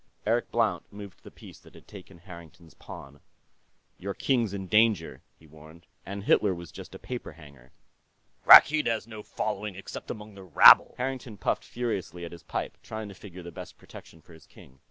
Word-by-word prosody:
Eric - - 0
Blount - - -1
moved 100 -2 -12
the - - -13
piece - - -15
that - - -20
had - - -17
taken 95 -2 -13
Harrington's 85 -1 -14
pawn. 70 +1 -12 0.8
"Your 100 +1 -5
king's 120 -6 0
in 100 -1 -6
danger," 105 -4 +1 0.2
he 80 - -21
warned. 80 +2 -17 0.2
"And 100 0 -6
Hitler 100 -2 +2
was 85 -2 -11
just - - -11
a - - -7
paper 125 -1 -8
hanger." 70 -6 -17 0.8
"Rakkeed 150 +1 +8
has 115 -1 -1
no 110 -2 -10
following, 105 -1 -5
except 95 - -9
among 105 0 -8
the 100 -1 -13
rabble." 90 -6 +7
Harrington 125 -4 -5
puffed 95 - -2
furiously 100 -7 -5
at 85 - -9
his 85 - -12
pipe, - - -6
trying 110 -1 -7
to - - -10
figure 95 -2 -12
the 85 - -9
best - - -11
protection 80 - -15
for 85 - -18
his 80 -2 -18
king. 65 +1 -19
95 Hz, 185 wpm, -27 LUFS, 85-105 Hz, 0.8 s, Rakkeed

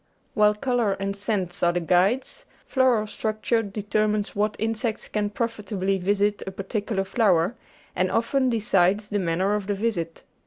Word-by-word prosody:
While 210 -3 +4
colour 240 -3 +1
and 195 0 -3
scent 200 -3 -2
are 175 0 +3
the 175 - +1
guides, 190 - +1 0.2
floral 255 -5 +2
structure 220 +2 -1
deter 210 +1 -1
mines 210 -1 -2
what 210 +1 0
insects 225 0 -2
can 210 -1 -1
profitably 205 -4 -2
visit 205 +2 +1
a - - 0
particular 195 +1 -2
flower, 195 -1 +2 0.4
and 185 +1 +1
often 260 +3 +1
decides 205 -2 +2
the 205 - 0
manner 185 +3 +1
of 210 -2 -2
the 205 - 0
visit. 195 -6 -2
205 Hz, 155 wpm, -25 LUFS, 195-220 Hz, 0.4 s, While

